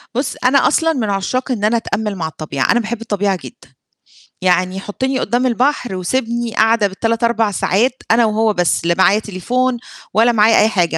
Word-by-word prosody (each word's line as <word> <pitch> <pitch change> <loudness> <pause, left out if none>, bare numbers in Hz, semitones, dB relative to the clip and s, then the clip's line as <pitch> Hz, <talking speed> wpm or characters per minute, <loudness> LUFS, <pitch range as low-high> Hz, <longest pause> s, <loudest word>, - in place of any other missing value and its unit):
بُصّ، 260 +1 -2
أنا 275 +2 +4
أصلًا 325 +2 +2
من 235 -8 -2
عشاق 255 +7 -2
إن 210 -4 -3
أنا 220 +3 +2
أتأمَّل 215 -2 -3
مع 165 -3 -3
الطبيعة 150 -4 -2
أنا 240 - +3
باحب 230 0 -4
الطبيعة 205 -3 -1
جدًا، 245 - -13 0.7
يعني 185 +1 +1
حطّني 260 +7 -3
قُدّام 245 +2 0
البحر 250 -3 0
وسيبني 235 +5 -2
قاعدة 220 -1 +3
بال3 225 +4 -2
4 230 -2 +1
ساعات 205 +6 +1 0.2
أنا 230 +1 +4
وهو 220 0 +1
بس، 175 -2 0
لا 170 0 +2
معايا 195 +2 +4
تليفون، 245 +6 -2 0.4
ولا 225 +4 +4
معايا 220 0 +4
أي 215 - +4
حاجة، 175 -6 0
220 Hz, 180 wpm, -17 LUFS, 195-240 Hz, 0.7 s, أنا